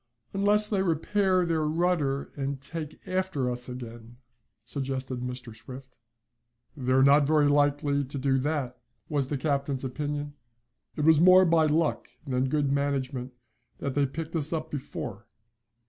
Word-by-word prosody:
"Unless 210 Hz, +2 st, +3 dB
they 200 Hz, -3 st, +1 dB
repair 185 Hz, +2 st, +1 dB
their 165 Hz, -2 st, 0 dB
rudder, 155 Hz, -3 st, 0 dB
and 140 Hz, -1 st, -3 dB
take 155 Hz, +2 st, -7 dB
after 185 Hz, -9 st, -1 dB
us 125 Hz, +1 st, -5 dB
again," 120 Hz, -1 st, -9 dB, 0.5 s
suggested 130 Hz, -1 st, -3 dB
Mr. 125 Hz, -2 st, -6 dB
Swift. 130 Hz, +3 st, -11 dB, 0.8 s
"They're 130 Hz, -1 st, +2 dB
not 140 Hz, +1 st, +5 dB
very 150 Hz, -1 st, +4 dB
likely 145 Hz, 0 st, +2 dB
to 140 Hz, +2 st, -6 dB
do 135 Hz, 0 st, +1 dB
that," 130 Hz, -4 st, -2 dB, 0.3 s
was 145 Hz, -3 st, 0 dB
the 145 Hz, -, -2 dB
captain's 140 Hz, -1 st, -1 dB
opinion. 145 Hz, +2 st, -3 dB, 0.6 s
"It -, -, -3 dB
was 160 Hz, -1 st, +6 dB
more 185 Hz, +1 st, +7 dB
by 165 Hz, -2 st, +4 dB
luck 155 Hz, +2 st, 0 dB, 0.2 s
than 130 Hz, -1 st, 0 dB
good 145 Hz, -1 st, +1 dB
management 135 Hz, -2 st, -1 dB, 0.4 s
that 140 Hz, -, -3 dB
they 140 Hz, 0 st, +2 dB
picked 160 Hz, +4 st, -6 dB
us 155 Hz, -1 st, 0 dB
up 160 Hz, -1 st, -3 dB
before. 125 Hz, -7 st, -6 dB
145 Hz, 145 wpm, -27 LUFS, 130-160 Hz, 0.8 s, more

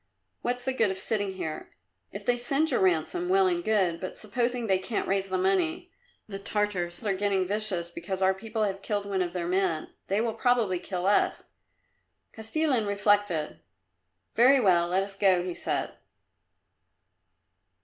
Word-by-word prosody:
What's 245 Hz, 0 st, -2 dB
the 265 Hz, -, 0 dB
good 225 Hz, -5 st, +2 dB
of 190 Hz, -, -3 dB
sitting 200 Hz, 0 st, -1 dB
here? 160 Hz, -4 st, -6 dB, 0.4 s
If -, -, -8 dB
they 245 Hz, -, +3 dB
send 275 Hz, +6 st, +2 dB
your -, -, +2 dB
ransom, 190 Hz, -, +1 dB
well 385 Hz, +1 st, +4 dB
and 350 Hz, -2 st, 0 dB
good, 190 Hz, -, +1 dB
but 185 Hz, -, -6 dB
supposing 240 Hz, +3 st, -1 dB
they 190 Hz, -3 st, +2 dB
can't 205 Hz, +3 st, -3 dB
raise 195 Hz, 0 st, 0 dB
the 185 Hz, -, 0 dB
money? 185 Hz, -, 0 dB, 0.4 s
The 195 Hz, -2 st, -6 dB
Tartars 200 Hz, -3 st, -2 dB
are 200 Hz, -, +1 dB
getting 195 Hz, -1 st, +1 dB
vicious 190 Hz, -4 st, -1 dB
because 185 Hz, +3 st, -5 dB
our 190 Hz, 0 st, +3 dB
people 220 Hz, +3 st, -3 dB
have 195 Hz, -2 st, -2 dB
killed 205 Hz, 0 st, -2 dB
one 195 Hz, -2 st, -1 dB
of 175 Hz, -1 st, -2 dB
their 175 Hz, -2 st, -3 dB
men. 180 Hz, -3 st, -1 dB
They 200 Hz, +2 st, +1 dB
will 225 Hz, 0 st, 0 dB
probably 230 Hz, -8 st, +1 dB
kill 180 Hz, 0 st, -4 dB
us." 200 Hz, +1 st, +1 dB, 0.8 s
Kostilin 235 Hz, 0 st, 0 dB
reflected. 200 Hz, -5 st, +1 dB, 0.7 s
"Very 260 Hz, +4 st, +6 dB
well; 175 Hz, -6 st, +3 dB
let 185 Hz, +2 st, +1 dB
us 195 Hz, 0 st, -6 dB
go," 190 Hz, -3 st, +3 dB
he 180 Hz, -1 st, -4 dB
said. -, -, -3 dB
200 Hz, 165 wpm, -27 LUFS, 185-225 Hz, 0.8 s, Very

